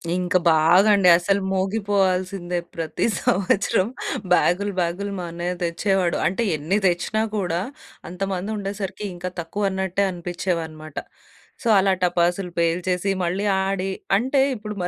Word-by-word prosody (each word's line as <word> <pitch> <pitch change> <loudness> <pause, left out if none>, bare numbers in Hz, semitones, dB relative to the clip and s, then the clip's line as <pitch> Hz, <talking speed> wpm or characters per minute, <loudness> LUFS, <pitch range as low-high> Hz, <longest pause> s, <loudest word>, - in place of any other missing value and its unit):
ఇంకా 180 0 +1
బాగా 170 +6 +5
అండి. 185 -3 +5
అసలు 195 +3 +1
మోగిపోవాల్సిందే 190 -2 0 0.2
ప్రతి 165 -1 -2 0.2
సంవత్సరం 195 +2 +1 0.5
బ్యాగ్‌లు 195 +4 +2
బ్యాగ్‌లు 180 +4 -1
మా 175 - -4
అన్నయ్య 175 +1 -3
తెచ్చేవాడు. 180 +1 0
అంటే 195 +7 -1
ఎన్ని 165 +8 0
తెచ్చినా 180 +5 0
కూడా 175 -3 -1 0.5
అంత 180 +2 -11
మంది 185 +3 -3
ఉండేసరికి 200 0 -5
ఇంకా 180 +1 -5
తక్కువన్నట్టే 190 +1 -1
అనిపిచ్చేవన్నమాట. 170 -3 -4 0.7
సో, - - -2
అలా 195 0 +3
టపాసులు 175 +1 +1
పేల్చేసి 180 +3 0
మళ్ళీ 185 +4 -1 0.2
ఆడి 195 0 -1 0.3
అంటే 260 +6 +1
ఇప్పుడు 210 -3 -6
185 Hz, 120 wpm, -23 LUFS, 175-200 Hz, 0.7 s, బాగా